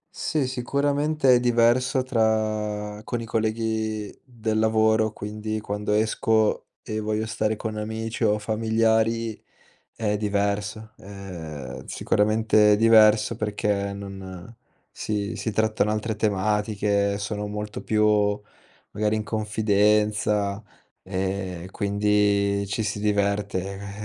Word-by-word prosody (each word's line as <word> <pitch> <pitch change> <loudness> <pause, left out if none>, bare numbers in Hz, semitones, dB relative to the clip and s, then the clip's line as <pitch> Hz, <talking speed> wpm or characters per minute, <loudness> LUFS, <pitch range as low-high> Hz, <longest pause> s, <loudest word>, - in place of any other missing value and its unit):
Sì, 155 -4 -1
sicuramente 140 +2 +1
è 125 - +5
diverso 125 +2 +3
tra 110 -3 -1
con 120 +2 -3
i 115 - -5
colleghi 110 -1 -2
del 110 -4 -2
lavoro, 110 0 +3
quindi 110 +1 -5
quando 105 0 -3
esco 110 0 +1 0.2
e 110 0 -3
voglio 110 0 -1
stare 110 0 -1
con 110 0 -5
amici 110 +2 -4
o 105 -1 +3
familiari 110 +1 0 0.5
è 105 -2 -1
diverso, 105 +1 -1
ehm, 85 -9 -8
sicuramente 110 0 +3
diverso 110 0 +5
perché 105 -2 -1
non 95 +1 -9 0.4
si 105 0 -3
si 110 - -3
trattano 110 -1 +1
altre 110 +1 -2
tematiche, 105 0 0
sono 105 0 -3
molto 105 0 -5
più 105 -1 +2 0.5
magari 105 +1 0
in 110 - -1
confidenza 105 -1 +1 0.4
e 95 -1 -3
quindi 100 0 +1
ci 100 +3 -2
si 105 -1 -3
diverte, 100 -2 0
eh, 100 +2 -7
105 Hz, 110 wpm, -25 LUFS, 100-110 Hz, 0.5 s, è